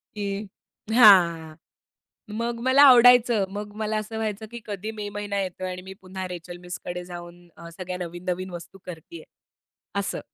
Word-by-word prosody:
की 200 Hz, 0 st, -4 dB, 0.5 s
हां, 170 Hz, -8 st, +6 dB, 0.8 s
मग 235 Hz, +1 st, -3 dB
मला 270 Hz, +2 st, +6 dB
आवडायचं 245 Hz, -5 st, +7 dB
मग 205 Hz, 0 st, -6 dB
मला 215 Hz, 0 st, -1 dB
असं 215 Hz, +1 st, -5 dB
व्हायचं, 220 Hz, -1 st, -3 dB
की 235 Hz, -, -7 dB
कधी 210 Hz, +1 st, -5 dB
मे 210 Hz, -2 st, -6 dB
महिना 205 Hz, -1 st, -3 dB
येतोय 185 Hz, 0 st, -4 dB
आणि 180 Hz, 0 st, -7 dB
मी 190 Hz, +1 st, -10 dB
पुन्हा 185 Hz, 0 st, -6 dB
रेचेल 175 Hz, 0 st, -8 dB
मिसकडे 180 Hz, 0 st, -7 dB
जाऊन 175 Hz, 0 st, -10 dB
अ, 170 Hz, 0 st, -10 dB
सगळ्या 180 Hz, +1 st, -6 dB
नवीन-नवीन 180 Hz, +1 st, -4 dB
वस्तू 175 Hz, +2 st, -9 dB
करतीये 180 Hz, -, -10 dB, 0.8 s
असं. 200 Hz, -, -3 dB
195 Hz, 150 wpm, -25 LUFS, 175-215 Hz, 0.8 s, आवडायचं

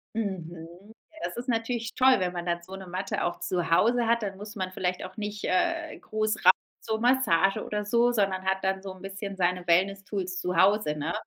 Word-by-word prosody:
Mhm, 180 Hz, -1 st, -5 dB, 0.2 s
ja, 320 Hz, -, -14 dB
das -, -, -4 dB
ist 245 Hz, +2 st, -6 dB
natürlich 230 Hz, 0 st, -1 dB
toll, 260 Hz, 0 st, +6 dB
wenn 180 Hz, -1 st, 0 dB
man 175 Hz, 0 st, -5 dB
dann 170 Hz, 0 st, -1 dB
so 190 Hz, +2 st, -10 dB
'ne 195 Hz, -1 st, -8 dB
Matte 185 Hz, +2 st, -3 dB
auch 175 Hz, -, -2 dB
zu 175 Hz, -2 st, -1 dB
Hause 235 Hz, +7 st, +4 dB
hat. 235 Hz, 0 st, +2 dB
Dann 195 Hz, -2 st, -3 dB
muss 210 Hz, +2 st, -9 dB
man 185 Hz, -1 st, -3 dB
vielleicht 180 Hz, -1 st, -2 dB
auch 185 Hz, -, -9 dB
nicht, 210 Hz, -1 st, -5 dB
äh, 325 Hz, -, 0 dB
groß 215 Hz, -1 st, -2 dB
rein 185 Hz, -, +10 dB, 0.3 s
zur 220 Hz, 0 st, -2 dB
Massage 225 Hz, -7 st, +3 dB
oder 210 Hz, 0 st, -3 dB
so, 235 Hz, +3 st, +3 dB
sondern 195 Hz, -4 st, 0 dB
hat 190 Hz, 0 st, +1 dB
dann 190 Hz, 0 st, 0 dB
so 195 Hz, -1 st, -6 dB
'n 185 Hz, -, -14 dB
bisschen 195 Hz, 0 st, -6 dB
seine 180 Hz, -1 st, 0 dB
Wellness 195 Hz, +3 st, +2 dB
Tools 185 Hz, -3 st, -3 dB
zu 180 Hz, -1 st, -2 dB
Hause, 190 Hz, -5 st, +3 dB
ne? 155 Hz, +3 st, -2 dB
195 Hz, 220 wpm, -27 LUFS, 180-220 Hz, 0.3 s, rein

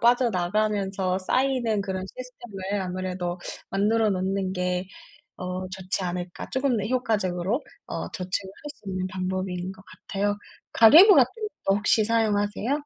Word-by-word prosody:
빠져나가면서 200 Hz, -4 st, +1 dB
쌓이는 240 Hz, +1 st, +1 dB
그런 190 Hz, -1 st, -3 dB
시스템을 205 Hz, -6 st, -5 dB
아무래도 180 Hz, -1 st, -3 dB, 0.3 s
만들어 215 Hz, +2 st, +2 dB
놓는 190 Hz, 0 st, -1 dB
게 180 Hz, 0 st, -1 dB, 0.5 s
어 185 Hz, 0 st, -4 dB
좋지 190 Hz, 0 st, -3 dB
않을까?' 175 Hz, 0 st, -4 dB
쪼끔 260 Hz, -3 st, +1 dB
더 205 Hz, -, -2 dB
효과적으로 215 Hz, -, 0 dB, 0.3 s
어 -, -, -4 dB
저축을 185 Hz, +1 st, -3 dB
할 295 Hz, -, -6 dB
수 -, -, -27 dB
있는 185 Hz, -1 st, -2 dB
방법인 185 Hz, -1 st, -3 dB
거 190 Hz, -, -16 dB
같아요. 200 Hz, +2 st, -3 dB, 0.4 s
가계부 330 Hz, -, +9 dB
같은 -, -, +7 dB, 0.4 s
것도 195 Hz, -, +4 dB
혹시 210 Hz, +1 st, +3 dB
사용하세요? 215 Hz, +1 st, +1 dB
195 Hz, 315 characters per minute, -26 LUFS, 185-220 Hz, 0.5 s, 가계부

